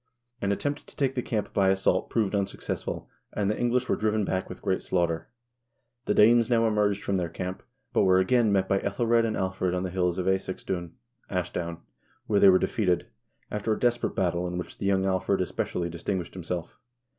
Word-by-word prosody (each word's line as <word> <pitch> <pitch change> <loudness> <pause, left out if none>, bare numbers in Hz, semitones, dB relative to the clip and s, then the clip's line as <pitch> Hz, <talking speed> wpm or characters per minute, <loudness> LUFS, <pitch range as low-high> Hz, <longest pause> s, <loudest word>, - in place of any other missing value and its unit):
An 100 - +1
attempt 145 +8 -2
to - - -15
take 135 -2 +1
the 125 - -1
camp 110 -4 -3
by 95 -2 +3
assault 95 -1 +1
proved 110 -4 0
unsuccessful, 100 -1 -3 0.3
and 105 -1 0
the - - -3
English 125 +1 +1
were - - +2
driven 110 -1 0
back 95 0 -2
with 90 - -8
great 95 -1 0
slaughter. 85 -2 -1 0.8
The 105 - +1
Danes 115 +2 +6
now 115 -2 +3
emerged 105 -2 +1
from 100 - 0
their 90 -2 -1
camp, 90 +2 -5 0.3
but - - +3
were 95 -1 +5
again 110 +4 +3
met 95 -1 +2
by 95 - +2
iEthelred 115 +3 +2
and 110 - -2
Alfred 95 -1 -1
on 90 - -1
the 90 - -3
hills 90 -1 0
of 90 - -1
^Escesdun 95 -2 -2 0.4
(Ashdown), 85 -2 -3 0.4
where 105 -2 +2
they 100 - +8
were 95 - +7
defeated, 90 -3 0 0.4
after 105 +1 0
a - - -4
desperate 120 -1 +1
battle 90 -1 0
in 90 0 -4
which 90 - -7
the 100 - -1
young 95 -1 +2
Alfred 95 -1 +1
especially 85 -1 -2
distinguished 85 +1 -3
himself. 90 -1 -5
95 Hz, 195 wpm, -27 LUFS, 90-105 Hz, 0.8 s, they